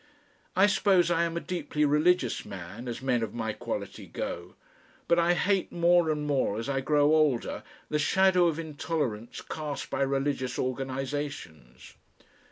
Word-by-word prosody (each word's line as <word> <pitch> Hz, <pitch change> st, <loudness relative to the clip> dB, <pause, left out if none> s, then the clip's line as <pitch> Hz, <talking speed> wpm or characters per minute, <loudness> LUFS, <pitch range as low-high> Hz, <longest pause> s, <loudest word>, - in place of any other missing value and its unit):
I 190 Hz, +2 st, +6 dB
suppose 190 Hz, -3 st, +3 dB
I 170 Hz, 0 st, +2 dB
am 170 Hz, 0 st, -3 dB
a -, -, +1 dB
deeply 170 Hz, -4 st, -1 dB
religious 150 Hz, -2 st, +2 dB
man, 100 Hz, +5 st, -8 dB
as 120 Hz, +1 st, -5 dB
men 125 Hz, -3 st, +1 dB
of 110 Hz, -1 st, -4 dB
my 110 Hz, -2 st, -2 dB
quality -, -, -5 dB
go, -, -, -5 dB, 0.5 s
but 170 Hz, -, +4 dB
I 170 Hz, +1 st, +3 dB
hate 195 Hz, +1 st, +1 dB
more 175 Hz, -1 st, +3 dB
and 150 Hz, -1 st, -1 dB
more, 135 Hz, -8 st, 0 dB
as 115 Hz, -, -4 dB
I 135 Hz, -1 st, 0 dB
grow 150 Hz, +2 st, +3 dB
older, 150 Hz, -6 st, +1 dB, 0.3 s
the 150 Hz, -, -1 dB
shadow 185 Hz, +2 st, +4 dB
of 165 Hz, -2 st, -1 dB
intolerance 150 Hz, -8 st, -3 dB
cast 150 Hz, -2 st, -5 dB
by -, -, -1 dB
religious 135 Hz, -2 st, -1 dB
organisations. 130 Hz, -, -4 dB
145 Hz, 155 wpm, -28 LUFS, 130-170 Hz, 0.5 s, I